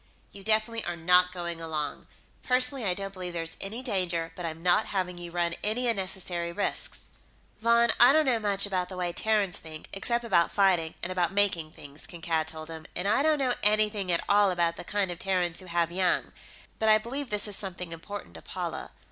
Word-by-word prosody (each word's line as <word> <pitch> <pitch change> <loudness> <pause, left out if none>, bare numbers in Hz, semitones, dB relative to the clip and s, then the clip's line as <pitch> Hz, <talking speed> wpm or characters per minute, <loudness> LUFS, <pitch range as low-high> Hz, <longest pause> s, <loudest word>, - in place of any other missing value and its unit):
"You 200 - -12
definitely 220 +2 +1
are 175 - -3
not 180 +2 +4
going 170 -2 -4
along. 155 -3 -4 0.3
Personally, 250 0 +2
I 180 -2 +2
don't 195 0 -5
believe 180 -2 -6
there's 165 -1 -1
any 220 +6 -4
danger, 180 -8 -1
but 175 -2 -4
I'm 165 +1 -7
not 180 +4 +3
having 180 -2 -2
you 175 0 -7
run 170 0 0
any 230 +4 +1
unnecessary 185 -5 -2
risks...." 200 +4 -3 0.5
"Von, 235 +1 +4
I 245 +2 +9
don't 310 +1 +4
know 245 -4 +2
much 200 -2 +1
about 185 -3 -2
the 185 - -7
way 175 -1 -2
Terrans 210 -4 +2
think, 155 -1 -10
except 235 +5 -1
about 180 -7 +3
fighting 180 -5 +2
and 175 - -2
about 180 0 0
making 195 -6 +1
things," 145 +1 -12
Kankad 165 -2 -2
told 155 0 -7
him. 160 -1 -8
"And 180 +3 -1
I 215 +6 +3
don't 310 +1 +3
know 260 -3 +2
anything 210 -2 +2
at 170 - +1
all 205 0 +5
about 170 -2 +1
the - - -7
kind 200 0 -1
of 175 - -7
Terrans 180 -3 0
who 185 - -9
have 170 -1 0
young. 180 0 +1 0.5
But 220 - +2
I 215 - +8
believe 250 +5 -5
this 210 0 +1
is 205 - -1
something 180 -3 -5
important 200 +5 -8
to - - -10
Paula. - - -5
185 Hz, 205 wpm, -28 LUFS, 170-215 Hz, 0.5 s, I